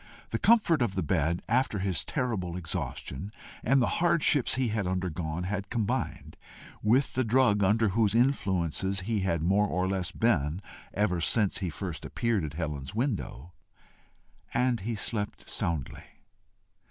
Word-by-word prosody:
The - - -1
comfort 205 - +4
of 115 -6 0
the - - 0
bed 85 -1 0
after 120 -2 +1
his 95 -6 0
terrible 95 -9 -2
exhaustion 80 0 -4 0.3
and 135 +3 +4
the 120 - 0
hardships 160 -5 +3
he 130 -2 +1
had 105 -3 -1
undergone, 90 -3 -2
had 100 +1 -3
combined 110 -4 -2 0.4
with 125 +6 +3
the 130 - +1
drug 110 -3 +3
under 110 +3 +3
whose 110 +1 +2
influences 95 - +1
he 110 +2 -1
had 85 -4 0
more 100 +4 +3
or 90 -1 0
less 95 -2 -1
been 85 -8 +1 0.3
ever 95 -4 0
since 105 +3 +2
first 90 -3 -4
he - - -5
appeared 115 -6 0
at 75 -1 -4
Helen's 75 -2 -4
window, 100 - -3 1.0
and 125 -2 +2
he 115 +4 -3
slept 105 0 -3
soundly. 80 -6 -3
100 Hz, 145 wpm, -29 LUFS, 85-115 Hz, 1.0 s, comfort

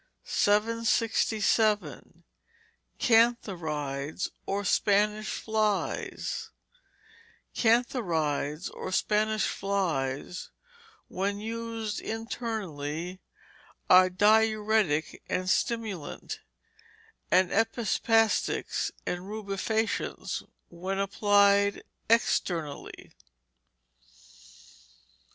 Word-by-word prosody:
767. 220 0 +1 0.7
Cantharides, 170 - +1 0.2
or 200 +1 -1
Spanish 210 +3 +2
flies 220 - -2 1.0
Cantharides, 175 - +1
or 185 - -6
Spanish 215 +2 +1
flies, 175 -6 -2 0.6
when 200 +2 -2
used 225 -1 -4
internally, 185 -7 -4 0.7
are 185 0 +8
diuretic 210 -4 +2
and 185 0 -1
stimulant; 215 - -2 0.9
and 185 -1 +4
epispastic 225 0 +2 0.4
and 180 +1 -3
rubefacient 215 +1 -2 0.3
when 185 +3 -4
applied 200 0 +3 0.3
externally. 170 -9 0
205 Hz, 55 wpm, -28 LUFS, 180-220 Hz, 1.0 s, are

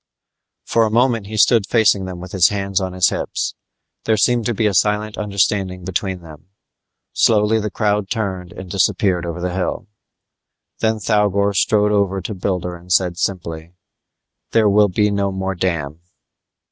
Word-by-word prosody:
For 115 - +2
a 110 - +1
moment 115 -2 +1
he 110 +1 -5
stood 110 -1 +4
facing 105 -4 +3
them 90 -1 -7
with 90 0 -9
his 90 -3 +4
hands 100 -2 -1
on 95 -1 -3
his 90 -1 +3
hips. - - -3 0.5
There 110 -1 +2
seemed 120 +2 +2
to 120 - 0
be 110 - 0
a 105 - +2
silent 105 +2 +1
understanding 100 -3 -1
between 95 0 -3
them. 80 +1 -14 0.7
Slowly 110 0 +3
the 105 0 -3
crowd 105 -1 -1
turned 95 -6 -3
and 95 - -9
disappeared 95 -1 +1
over 85 +1 -5
the 90 0 -3
hill. 95 +3 -3 0.9
Then 110 0 +1
Thougor 100 -1 +1
strode 105 +2 +2
over 100 -2 +1
to 100 +4 -5
Builder 90 -2 -3
and 90 +1 -13
said 90 -1 +2
simply, 85 -3 -4 0.8
"There 110 -2 +4
will 105 0 +4
be 105 +3 +1
no 100 -1 0
more 95 0 -3
dam." 85 -5 -2
100 Hz, 165 wpm, -19 LUFS, 90-105 Hz, 0.9 s, stood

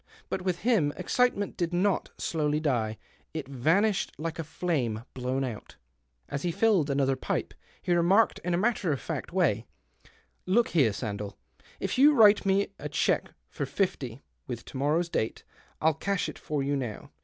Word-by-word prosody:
But - - -2
with 180 -2 -2
him 200 -10 +3
excitement 205 +2 +1
did 175 0 -1
not 195 +2 +1
dowly 150 -2 0
die; 115 -8 0 0.4
it 155 -4 -4
vanished 175 - +2
like 165 +1 -4
a - - -1
flame 145 -9 -2
blown 130 +1 -1
)ut. 120 -5 -6 0.5
As 140 - -4
he 175 - 0
filled 195 -5 +3
another 135 -1 +2
pipe, 130 - -3 0.3
he 175 - +1
remarked, 185 +6 +4
n 180 0 0
a - - +1
matter 205 -4 +1
of 140 - -1
fact - - -4
w^ay 145 - +1 0.2
— - - -28
" - - -44
Look 240 - +4
here, 140 -9 +4
Sandell, 100 -1 -4 0.4
if - - -2
you'll 295 +2 +7
write 210 -4 +6
me 195 +1 +2
a - - -5
lieque - - +1 0.2
for - - -4
fifty, 135 - -2 0.2
with 120 -2 -5
to - - -8
morrow's 150 +5 +1
date, 110 -9 -2 0.4
I'll 160 +1 +3
^ash 200 -2 0
it - - -7
for 150 -3 -2
you 140 +1 0
now. 120 - -5
160 Hz, 180 wpm, -28 LUFS, 135-190 Hz, 0.5 s, you'll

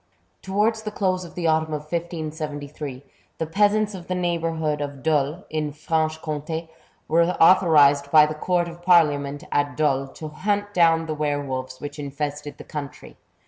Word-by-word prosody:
Towards 210 +3 0
the 215 - -4
close 185 -3 -1
of 170 - -13
the 175 - -3
autumn 160 -1 +1
of 150 - -5
1578, 150 -4 -5 0.3
the 160 - -2
peasants 205 +5 +2
of 180 -3 -9
the 185 - -1
neighbourhood 165 -4 -1
of 140 -2 -6
Dole, 155 +2 0
in 155 -1 -2
Franche 155 +1 -1
Comt^, 160 +1 -4 0.4
were 165 +2 +3
authorized 150 -6 +5
by 150 0 +7
the 155 - -3
Court 175 +2 0
of 170 0 -10
Parliament 145 -5 +3
at 145 0 0
Dole, 135 -3 +1
to 155 +3 -8
hunt 205 +5 -2
down 165 -2 +4
the 155 - -3
were 145 -1 -1
wolves 130 -1 -5
which 145 +1 -7
infested 145 +1 -5
the - - -10
country. 145 -4 -8
155 Hz, 165 wpm, -23 LUFS, 145-170 Hz, 0.4 s, by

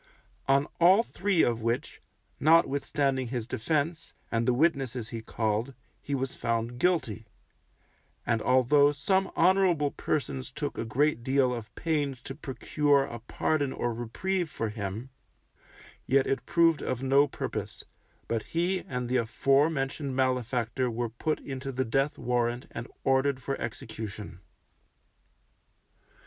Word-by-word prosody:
On 135 +1 +4
all 185 +6 +6
three 195 -6 +1
of 115 -1 +1
which, 115 +2 -2 0.4
notwithstanding 140 -4 +2
his 120 -2 -3
defence, 155 +7 -2 0.2
and 115 +1 0
the - - +5
witnesses 130 -6 +1
he 115 -1 -5
called, 110 +3 -2 0.3
he 140 - -2
was 135 -1 -2
found 115 +1 -2
guilty; 120 - 0 1.0
and 115 -2 +1
although 130 +4 +4
some 190 +7 +1
honourable 175 -5 +3
persons 135 -3 -2
took 145 +1 -4
a - - -3
great 135 +2 +1
deal 130 -1 +2
of 110 -3 -7
pains 145 -5 -1
to 135 - -6
procure 145 0 +1
a 120 -3 -6
pardon 140 +4 -1
or 120 -2 -2
reprieve 170 +10 -2
for 115 -7 -3
him, 105 +4 -5 1.0
yet 135 0 +4
it 135 - -2
proved 165 -2 +4
of 130 0 -3
no 140 +2 +4
purpose, - - -5 0.4
but 115 -1 -1
he 175 - -1
and 125 -1 -3
the 125 +1 +1
afore 135 +6 +3
mentioned 135 -2 -3
malefactor 125 -1 0
were 120 0 -2
put 135 +7 -2
into 135 0 -5
the 130 0 -1
death 135 +5 0
warrant 120 0 -1
and 115 +2 -6 0.2
ordered 135 0 +2
for 135 +2 -3
execution. 110 -5 -6
130 Hz, 135 wpm, -28 LUFS, 120-145 Hz, 1.0 s, all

